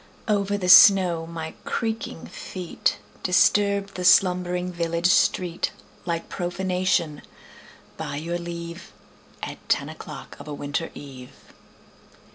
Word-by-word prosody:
Over 205 -1 +1
the 185 -2 -3
snow 180 -2 +7
my 160 -1 -6
creaking 225 -7 -3
feet 180 -3 -3 0.2
Disturbed 200 +2 +2
the 180 - -5
slumbering 180 0 +3
village 170 0 -2
street 175 -2 +1 0.4
Like 170 -1 -2
profanation, 180 -3 -1 0.8
by - - -5
your 170 +4 -3
leave, 170 0 -7 0.5
At - - -5
ten - - +1
o'clock - - -10
of - - -11
a 150 - -5
winter 145 +4 -3
eve. 130 -3 -11
175 Hz, 110 wpm, -24 LUFS, 165-185 Hz, 0.8 s, snow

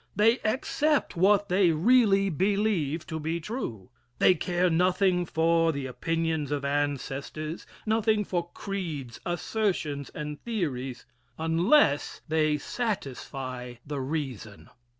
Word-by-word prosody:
They 225 +5 +4
accept 295 +5 0
what 200 +3 +4
they 185 -1 +4
really 195 +2 +4
believe 185 -3 0
to 160 -1 -4
be 160 +2 -2
true. 140 - -5 0.3
They - - +6
care 180 +2 0
nothing 180 +1 +2
for 165 0 +3
the 140 -3 -4
opinions 160 +2 -1
of 145 -1 -1
ancestors, 145 +2 -3 0.2
nothing 215 -1 +2
for 175 -2 -2
creeds, 160 - -5
assertions 175 -5 -1
and 150 -1 -5
theories, 135 - -3 0.3
unless 165 - +3
they 155 -1 +2
satisfy 135 - -4
the 145 -1 -4
reason. 130 -7 -5
165 Hz, 110 wpm, -28 LUFS, 145-200 Hz, 0.3 s, They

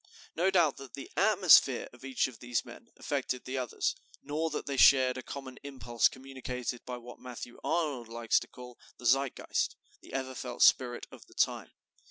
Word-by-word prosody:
No 175 +4 +2
doubt 170 -7 +3
that 135 -4 -10
the 140 - -9
atmosphere 185 - +5
of 125 - -16
each 135 -1 0
of 130 -4 -7
these 120 -1 -2
men - - -13
affected 125 - -3
the 130 +1 -3
others, 125 -3 -1 0.3
nor 155 +3 -1
that 150 - -4
they 140 - -3
shared 130 -1 +6
a 130 - -5
common 130 -1 -8
impulse 125 -5 +1
communicated 130 -2 -6
by 125 -1 -4
what 120 0 -11
Matthew 120 -1 -9
Arnold 145 -8 -1
likes 115 0 +1
to - - -10
call 125 -1 -12 0.2
the 125 - -12
Zeitgeist, 135 +2 +1 0.3
the - - -14
ever 130 -1 -3
felt 125 -1 -2
spirit 120 -2 +4
of - - -14
the - - -20
time. - - 0
130 Hz, 185 wpm, -31 LUFS, 125-140 Hz, 0.3 s, shared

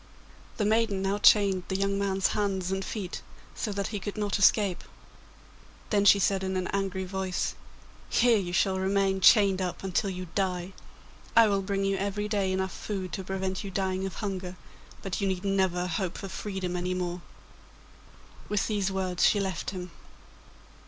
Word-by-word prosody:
The 210 - 0
maiden 215 -2 +2
now 195 +1 0
chained 200 -3 +5
the 190 - -2
young 195 +1 0
man's 195 -1 +1
hands 195 -3 -1
and 190 0 -1
feet 190 -3 -5 0.3
so 215 - -3
that 200 0 -2
he 210 - -3
could 200 +3 -6
not 205 -1 -1
escape; 200 -2 +3 1.1
then 205 -2 +3
she 200 - +8
said 195 0 +1
in 190 0 -1
an 185 - -1
angry 195 -1 -2
voice, 190 -1 -2 0.6
'Here 235 -2 +4
you 180 -3 -4
shall 190 +1 +1
remain 195 0 +1
chained 195 -2 +6
up 180 0 -3
until 195 +1 0
you 185 -1 -5
die. 185 -1 -1 0.6
I 230 -1 +7
will 200 -1 +1
bring 195 0 -1
you 195 0 +1
every 200 +2 -2
day 200 -3 0
enough 190 0 -1
food 190 -4 -5
to 190 - -3
prevent 190 0 -3
you 200 - -5
dying 190 0 -1
of 190 - -8
hunger, 190 -3 -4 0.5
but 195 +1 -3
you 200 - +1
need 190 0 -2
never 190 -2 +1
hope 180 0 -2
for 195 - -6
freedom 190 -3 -4
any 180 +1 -1
more.' 180 -1 -3 1.3
With 205 -2 +1
these 200 -3 0
words 185 -2 -1
she 205 - +5
left 190 -4 -2
him. 180 -2 -6
195 Hz, 175 wpm, -28 LUFS, 185-200 Hz, 1.3 s, she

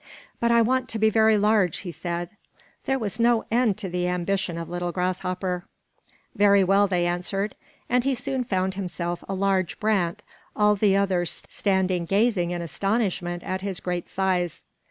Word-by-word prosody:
"But 235 - +2
I 235 0 +5
want 255 +2 0
to 225 - -2
be 220 0 +3
very 220 0 +4
large," 205 -5 +2
he 180 - -6
said. 175 0 -4 0.5
There 270 - +1
was 215 -2 -4
no 235 -1 +3
end 230 -4 +2
to 210 -2 -4
the 180 0 -1
ambition 180 0 -1
of 165 -1 -5
little 175 0 -3
Grasshopper. 180 0 -2 0.7
"Very 200 -3 +5
well," 195 +2 +4
they 180 -2 +1
answered, 180 +4 -1 0.3
and 245 0 +2
he 270 0 +1
soon 260 +2 -2
found 190 -4 -1
himself 175 -2 -4
a 195 - -1
large 190 -2 0
brant, 210 -2 0 0.3
all 210 0 +4
the 200 -1 +3
others 185 -3 0
standing 190 -3 0
gazing 195 -1 +2
in 175 -1 -3
astonishment 180 -1 -1
at 185 0 -3
his 195 -2 -3
great 180 -1 -3
size. 185 -3 -1
190 Hz, 170 wpm, -25 LUFS, 175-215 Hz, 0.7 s, I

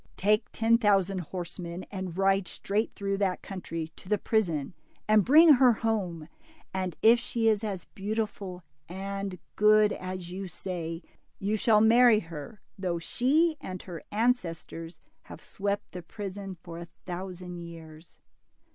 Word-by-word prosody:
Take 210 +3 +2
ten 230 +1 +3
thousand 195 -3 +3
horsemen 175 0 -6
and 185 -3 -5
ride 195 -1 +2
straight 210 +5 -1
through 195 0 -2
that 190 -3 0
country 165 -4 -5
to 185 - -13
the 210 - +3
prison, 180 -10 0 0.3
and 215 -1 +5
bring 310 - +8
her 255 -2 +6
home, 195 -8 -2 0.5
and 185 -2 -2
if 230 +2 +7
she 235 -1 -1
is 215 -1 +3
as 195 -5 -3
beautiful 200 -3 -4 0.3
and 195 +1 -4 0.2
good 210 0 +5
as 185 -1 -6
you 190 +1 -5
say, 175 -2 -5 0.3
you 205 +2 -1
shall 215 0 +4
inarry 230 0 +6
her 165 +5 -9 0.2
though 180 -3 -1
she 295 - +2
and 185 -1 -6
her 175 -4 -7
ancestors 175 -7 -1 0.3
have - - -10
swept 200 0 -3
the 180 - -6
prison 195 +1 -7
for 170 -1 -8
a 170 - -8 0.2
thousand 180 0 -6
years." 165 -1 -11
195 Hz, 145 wpm, -28 LUFS, 175-215 Hz, 0.5 s, bring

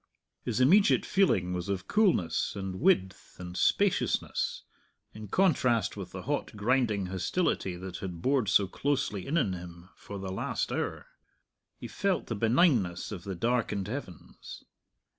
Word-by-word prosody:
His 120 -1 -2
immediate 185 +11 +5
feeling 100 - +2
was 90 +1 -4
of 95 -1 -3
coolness 175 - +1
and 95 -2 -5
width 95 - +1
and 90 0 -7
spaciousness, 195 - +1 0.5
in 110 0 -9
contrast 130 - +2
with - - -7
the - - -7
hot - - -3
grinding 110 -2 +1
hostility 95 - -1
that 90 0 -7
had 90 -3 -6
bored 130 +1 +1
so 100 - +4
closely 105 -2 -2
in 155 - 0
on 105 - +1
him 85 0 -9
for 100 - -9
the 95 -1 -5
last 95 - -2
hour. - - -3 0.7
He - - -7
felt 195 -2 -1
the 115 - -4
benignness 115 - +2
of 95 -2 -7
the 95 -1 -4
darkened 115 -2 0
heavens. 110 - -8
100 Hz, 145 wpm, -29 LUFS, 95-135 Hz, 0.7 s, immediate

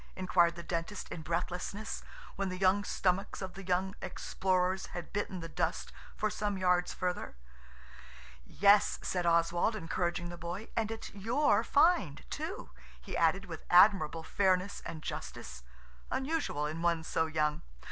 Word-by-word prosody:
inquired 175 -2 +3
the 170 - -7
Dentist 170 +4 -4
in 165 - -5
breathlessness, 180 +5 -3 0.3
when 195 -1 -1
the 185 - -4
young 190 +2 +3
stomachs 190 -1 0
of 190 -2 -5
the 195 - -8
young 185 +1 0
explorers 185 0 0
had 175 - -7
bitten 200 -3 -2
the 165 - -5
dust 160 - -2 0.2
for 215 - 0
some 205 -1 -2
yards 180 -1 +2
further. 180 -1 -3 1.1
"Yes," 200 - +4
said 180 -2 -1
Oswald, 170 +5 +3
encouraging 175 -1 -2
the 175 0 -8
boy, 175 +6 -5
"and 220 -2 0
it's 225 0 -6
your 230 +9 +2
find, 285 - +3
too," - - -5 0.3
he - - -7
added, 175 +4 +2
with 165 -4 -8
admirable 175 -4 +5
fairness 185 +2 +1
and 160 -2 -7
justice, 65 -1 -6 0.5
unusual 270 - -1
in 155 +2 -4
one 170 -1 +1
so 160 0 0
young. 150 -1 0
180 Hz, 145 wpm, -32 LUFS, 170-200 Hz, 1.1 s, admirable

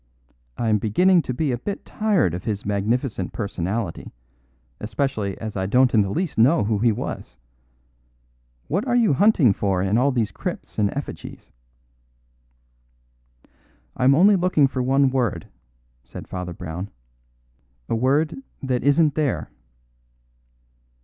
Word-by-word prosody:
I 115 - -1
am 105 -1 +3
beginning 175 - +3
to 130 - -5
be 140 +3 -1
a 120 - -2
bit 200 +9 -5
tired 205 - +1
of 90 +1 -6
his 105 -3 -3
magnificent 105 0 -1
personality, 100 -1 -4 0.7
especially 105 -2 -2
as 110 -2 -6
I 95 -1 -1
don't 125 +4 +3
in 110 - +5
the 100 - -1
least 165 - -2
know 135 +7 +4
who 105 0 0
he 115 +1 +3
was. 85 - -6 1.3
What 190 - -1
are 245 - +1
you 230 -10 +4
hunting 150 - +4
for 95 -2 -1
in 100 +4 +2
all 140 +3 +3
these 115 -5 -1
crypts - - -6
and 100 -1 +2
effigies?" 140 - -8 2.4
"I - - -2
am 135 +2 +6
only 200 +6 +6
looking 180 -5 +3
for 130 -1 -2
one 135 +1 +3
word," 120 -10 -1 0.6
said 65 - -10
Father 90 -1 -5
Brown. 90 +3 -6 1.0
"A - - -2
word 145 - +1 0.2
that 130 -2 -1
isn't 145 +2 +3
there." 150 -2 -1
125 Hz, 140 wpm, -23 LUFS, 100-145 Hz, 2.4 s, am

